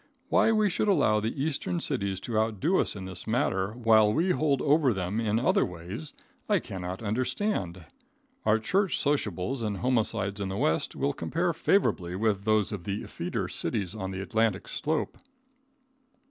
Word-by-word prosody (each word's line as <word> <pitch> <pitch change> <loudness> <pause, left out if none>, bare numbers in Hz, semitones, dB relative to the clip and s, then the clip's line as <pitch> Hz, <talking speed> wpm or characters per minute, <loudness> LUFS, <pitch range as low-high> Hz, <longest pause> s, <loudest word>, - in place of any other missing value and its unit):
Why - - +4
we 215 -1 +3
should 200 +2 0
allow 140 - +3
the 110 +5 -3
Eastern 160 +3 -1
cities 100 - -1
to 115 - -4
outdo 110 - +1
us - - 0
in 95 -2 -6
this 95 +1 -5
matter 105 -4 0
while 110 -3 +4
we 170 - +2
hold 150 -6 +2
over 145 -5 +3
them 95 +3 -2
in 110 -1 +1
other 120 - +3
ways, 90 - -6 0.4
I - - +4
cannot 95 +2 -5
understand. 110 - -1 0.6
Our 110 0 +4
church 190 - +1
sociables 130 - -1
and 105 -3 -2
homicides 110 -4 0
in 95 - -2
the 95 - -3
West 80 -4 0
will 70 - 0
compare - - -1
favorably 90 0 +1
with 100 -1 0
those 110 -2 +2
of 95 -5 -5
the 100 +1 -3
effeter - - -3
cities 95 -3 -3
of 95 -3 -4
the 95 0 -4
Atlantic 110 -2 0
slope. 155 +1 -2
110 Hz, 165 wpm, -28 LUFS, 95-135 Hz, 0.6 s, Why